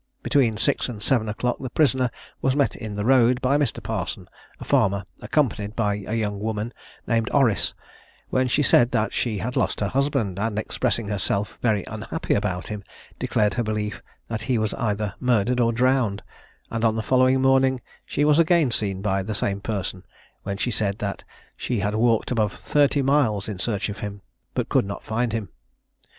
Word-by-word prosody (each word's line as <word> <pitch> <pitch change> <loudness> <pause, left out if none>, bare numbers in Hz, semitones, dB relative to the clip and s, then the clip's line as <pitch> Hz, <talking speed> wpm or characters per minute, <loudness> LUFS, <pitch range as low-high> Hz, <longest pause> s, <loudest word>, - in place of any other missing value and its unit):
Between 120 -6 +2
six 140 +2 +1
and 115 -4 -6
seven 110 0 +1
o'clock 120 +3 -1
the 130 - -5
prisoner 130 -3 +2 0.3
was 135 0 +2
met 145 -2 +2
in 110 -4 -6
the 105 0 -2
road 125 -1 +4
by 130 +2 +2
Mr. 145 - -1
Parson, - - -4 0.3
a - - -7
farmer, 100 0 +2 0.2
accompanied 110 -8 0
by 105 -3 0
a 110 - -1
young 105 -3 -1
woman 110 +2 -3 0.3
named 115 -2 +1
Orrice, 125 -9 +2 0.6
when 130 0 +2
she 135 +4 +2
said 120 -2 +5
that 110 - +1
she 115 -4 -1
had 120 +7 -3
lost - - 0
her 105 - 0
husband, 130 -8 0
and 105 0 -1
expressing 110 0 -1
herself 100 0 -1
very 105 -5 +2
unhappy - - -3
about 90 0 -1
him, 105 -1 -5 0.4
declared 105 -1 +1
her 120 - 0
belief 105 -1 -3 0.3
that 110 -2 -3
he 125 +2 0
was 110 -1 0
either 105 -5 -1
murdered 125 -1 +2
or 115 -1 +3
drowned, 120 -4 +1 0.5
and 115 0 -2
on 110 -1 +3
the 110 - -2
following 130 +1 +4
morning 135 0 +3 0.2
she 145 - 0
was 150 +1 +4
again 165 -5 +4
seen 100 -4 -1
by 95 -2 +1
the 105 +2 -4
same 100 0 0
person, 95 -3 -3 0.4
when 100 0 -4
she 120 - -1
said 105 -2 -1
that 100 -2 -4 0.3
she 120 -5 -2
had 100 +2 0
walked 115 +1 +2
above 110 -4 +1
thirty 145 -1 +2
miles 130 -8 +2
in 105 -4 -5
search 105 0 -1
of 105 0 -6
him, 100 -1 -6 0.3
but - - -1
could - - +3
not 100 - -6
find 115 +1 -1
him. 110 -4 -3
110 Hz, 190 wpm, -24 LUFS, 105-130 Hz, 0.6 s, said